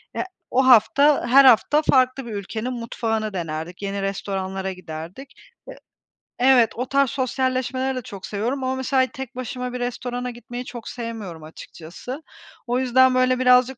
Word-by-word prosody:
eee, -, -, -1 dB, 0.3 s
o 260 Hz, +1 st, +3 dB
hafta, 260 Hz, +4 st, +5 dB
her 270 Hz, +3 st, +7 dB
hafta 260 Hz, +4 st, +5 dB
farklı 260 Hz, -2 st, +2 dB
bir 235 Hz, -, -7 dB
ülkenin 220 Hz, +5 st, -4 dB
mutfağını 225 Hz, -2 st, -3 dB
denerdik, 165 Hz, 0 st, -5 dB
yeni 200 Hz, 0 st, -3 dB
restoranlara 190 Hz, -1 st, -3 dB
giderdik. 180 Hz, -, -9 dB, 0.3 s
Eee, -, -, -10 dB, 0.6 s
evet, 250 Hz, -3 st, +5 dB
o 250 Hz, -, -2 dB
tarz 275 Hz, -1 st, +3 dB
sosyalleşmeleri 260 Hz, 0 st, -1 dB
de -, -, -3 dB
çok 200 Hz, -4 st, -9 dB
seviyorum 240 Hz, +7 st, -3 dB
ama 260 Hz, 0 st, -1 dB
mesela 260 Hz, 0 st, +1 dB
tek 265 Hz, -1 st, -9 dB
başıma 250 Hz, 0 st, -5 dB
bir 250 Hz, -, -4 dB
restorana 245 Hz, 0 st, -4 dB
gitmeyi 240 Hz, +1 st, -8 dB
çok 240 Hz, -3 st, -8 dB
sevmiyorum 220 Hz, -9 st, -7 dB
açıkçası. 170 Hz, -, -9 dB, 0.4 s
O 245 Hz, +1 st, +1 dB
yüzden 260 Hz, 0 st, +4 dB
böyle 255 Hz, 0 st, +2 dB
birazcık 250 Hz, 0 st, +4 dB
245 Hz, 155 wpm, -22 LUFS, 205-260 Hz, 0.6 s, her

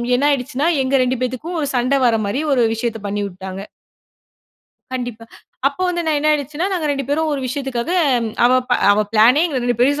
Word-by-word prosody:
என்னாயிடுச்சுன்னா, 280 Hz, +1 st, 0 dB, 0.2 s
எங்க 260 Hz, +1 st, 0 dB
2 255 Hz, +1 st, -1 dB
பேத்துக்கும் 260 Hz, +8 st, -3 dB
ஒரு 285 Hz, -, -1 dB
சண்ட 250 Hz, +3 st, +2 dB
வர 235 Hz, -2 st, +3 dB
மாரி 200 Hz, +7 st, -2 dB
ஒரு 250 Hz, -3 st, +3 dB
விஷயத்தை 225 Hz, -1 st, -3 dB
பண்ணி 205 Hz, +1 st, -2 dB
விட்டாங்க. 190 Hz, 0 st, -8 dB, 1.3 s
கண்டிப்பா, 245 Hz, -3 st, -5 dB, 0.4 s
அப்ப 280 Hz, -, -15 dB
வந்து 345 Hz, -1 st, -1 dB
நான் 310 Hz, -1 st, +2 dB
என்ன 305 Hz, +1 st, +1 dB
ஆயிடுச்சுன்னா, 300 Hz, +4 st, -2 dB
நாங்க 335 Hz, -5 st, -1 dB
2 275 Hz, -1 st, -2 dB
பேரும் 310 Hz, +2 st, 0 dB
ஒரு 285 Hz, -, -2 dB
விஷயத்துக்காக 260 Hz, +1 st, -3 dB, 0.5 s
அவ 245 Hz, -, +5 dB, 0.2 s
ப -, -, +3 dB, 0.2 s
அவ 205 Hz, -, +2 dB
ப்ளானே 230 Hz, +6 st, +5 dB
எங்க 285 Hz, -6 st, -2 dB
2 245 Hz, -1 st, 0 dB
பேரையும் 285 Hz, +4 st, +3 dB
260 Hz, 180 wpm, -19 LUFS, 240-290 Hz, 1.3 s, அவ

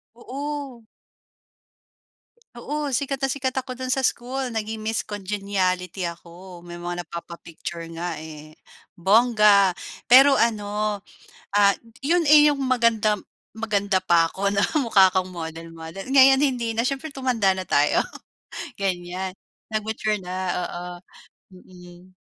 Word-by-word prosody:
Oo. 275 Hz, 0 st, -6 dB, 1.7 s
Oo 295 Hz, +3 st, -3 dB
sikat 275 Hz, +1 st, -2 dB
na 270 Hz, -, +1 dB
sikat 260 Hz, -1 st, -2 dB
ako 255 Hz, -1 st, -8 dB
dun 255 Hz, 0 st, -1 dB
sa 270 Hz, -, -1 dB
school. 255 Hz, +1 st, -1 dB
Naging 220 Hz, -1 st, -4 dB
Miss 220 Hz, 0 st, -2 dB
Congeniality 195 Hz, -3 st, -2 dB
ako. 175 Hz, +1 st, -8 dB
May 175 Hz, 0 st, -9 dB
mga 175 Hz, 0 st, -4 dB
napapa-picture 170 Hz, 0 st, -8 dB
nga, 170 Hz, 0 st, -4 dB
eh, 155 Hz, 0 st, -11 dB, 0.4 s
bongga. 210 Hz, 0 st, +5 dB, 0.4 s
Pero 270 Hz, +3 st, +8 dB
ano, 210 Hz, -3 st, 0 dB, 0.6 s
ah, 200 Hz, -1 st, +5 dB, 0.2 s
yun, 335 Hz, +5 st, +2 dB
eh, 300 Hz, 0 st, +8 dB
yung 290 Hz, -2 st, +2 dB
magandam, 230 Hz, -5 st, +2 dB, 0.3 s
maganda 205 Hz, -3 st, 0 dB
pa 170 Hz, -3 st, +3 dB
ako 200 Hz, +1 st, -1 dB
na 200 Hz, -, +2 dB, 0.2 s
mukha 200 Hz, -8 st, +5 dB
kong 185 Hz, 0 st, -1 dB
model 165 Hz, 0 st, -7 dB
model. 165 Hz, +4 st, -8 dB
Ngayon 270 Hz, 0 st, +7 dB
hindi 250 Hz, -5 st, 0 dB
na 230 Hz, +2 st, 0 dB
siyempre, 275 Hz, +4 st, -3 dB
tumanda 250 Hz, -7 st, +1 dB
na 185 Hz, 0 st, -5 dB
tayo 145 Hz, +1 st, +3 dB, 0.8 s
ganyan. 185 Hz, -1 st, -3 dB, 0.4 s
Nag-mature 215 Hz, -1 st, -1 dB
na 180 Hz, 0 st, -7 dB, 0.3 s
oo, 175 Hz, 0 st, -5 dB, 0.7 s
mhm. 180 Hz, 0 st, -16 dB
205 Hz, 125 wpm, -23 LUFS, 180-255 Hz, 1.7 s, Pero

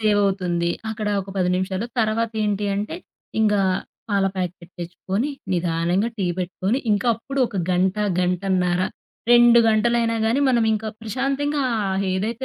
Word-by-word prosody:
Save 210 Hz, -2 st, +3 dB
అవుతుంది. 175 Hz, -3 st, 0 dB, 0.2 s
అక్కడ 215 Hz, -1 st, -3 dB
ఒక 195 Hz, +1 st, -9 dB
10 180 Hz, -1 st, +1 dB
నిమిషాలు, 190 Hz, +4 st, -2 dB
తర్వాత 225 Hz, +1 st, 0 dB
ఏంటి 205 Hz, 0 st, 0 dB
అంటే, 210 Hz, +11 st, -3 dB, 0.4 s
ఇంగా 210 Hz, -2 st, +3 dB, 0.5 s
పాల 200 Hz, -1 st, +2 dB
ప్యాకెట్ 180 Hz, -1 st, -4 dB
తెచ్చుకొని, 190 Hz, -, -3 dB, 0.2 s
నిదానంగా 175 Hz, +5 st, 0 dB
టీ 190 Hz, -, 0 dB
పెట్టుకొని, 185 Hz, +6 st, -1 dB
ఇంకా 205 Hz, +4 st, 0 dB
అప్పుడు 270 Hz, +4 st, -4 dB
ఒక 205 Hz, -, -7 dB
గంట, 185 Hz, +2 st, +2 dB, 0.2 s
గంటన్నర. 180 Hz, 0 st, +1 dB, 0.5 s
2 240 Hz, 0 st, +7 dB
గంటలైనా 230 Hz, +1 st, +2 dB
కానీ 240 Hz, +6 st, +2 dB
మనం 235 Hz, -3 st, +3 dB
ఇంకా 220 Hz, 0 st, -2 dB
ప్రశాంతంగా, 275 Hz, +5 st, -1 dB, 0.2 s
ఆ -, -, -1 dB, 0.3 s
ఏదైతే 225 Hz, +6 st, -2 dB
205 Hz, 140 wpm, -22 LUFS, 185-230 Hz, 0.5 s, 2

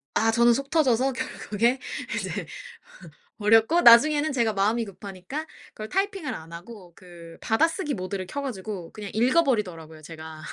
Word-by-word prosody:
아 225 Hz, -, +3 dB
저는 235 Hz, +1 st, +4 dB
속 275 Hz, +3 st, -3 dB
터져서 265 Hz, -4 st, +2 dB
결국에 235 Hz, -1 st, -1 dB, 0.4 s
이제 -, -, -4 dB, 0.9 s
버렸고 225 Hz, +10 st, +4 dB
나중에는 290 Hz, +6 st, +6 dB
제가 235 Hz, -4 st, +1 dB
마음이 215 Hz, +4 st, +1 dB
급하니까 200 Hz, -, -7 dB, 0.3 s
그걸 215 Hz, 0 st, -7 dB
타이핑을 390 Hz, -4 st, -2 dB
안 160 Hz, +1 st, -9 dB
하고 180 Hz, +1 st, -11 dB
그 170 Hz, -3 st, -14 dB
받아쓰기 320 Hz, -, +1 dB
모드를 185 Hz, 0 st, -5 dB
켜 285 Hz, -, -5 dB
가지고 205 Hz, -9 st, -6 dB
그냥 210 Hz, -2 st, -8 dB
읽어버리더라고요 210 Hz, -, 0 dB
제가. 160 Hz, 0 st, -10 dB
225 Hz, 350 characters per minute, -25 LUFS, 185-270 Hz, 0.9 s, 나중에는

